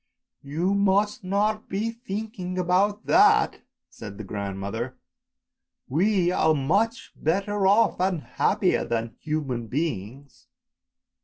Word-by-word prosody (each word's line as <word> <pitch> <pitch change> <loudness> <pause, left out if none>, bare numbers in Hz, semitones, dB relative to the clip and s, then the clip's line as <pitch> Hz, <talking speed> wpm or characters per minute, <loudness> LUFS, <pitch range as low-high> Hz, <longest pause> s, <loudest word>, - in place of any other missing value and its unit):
" - - -59 0.2
You 185 +3 +2
must 200 +3 +2
not 210 +3 0
be 210 +4 -1
thinking 215 -5 -5
about 190 +4 +1
that," 420 +4 +4 0.3
said 100 -3 -10
the 110 - -6
grand 100 -1 -5
mother, 110 +6 -4 0.5
" - - -61
we 185 -1 +3
are 160 -3 +3
much 205 - 0
better 195 +4 0
off 205 +2 +3
and 185 -4 0
happier - - +1
than 115 0 -3
human 140 -7 -3
beings." 135 - -4
185 Hz, 125 wpm, -25 LUFS, 135-205 Hz, 0.5 s, that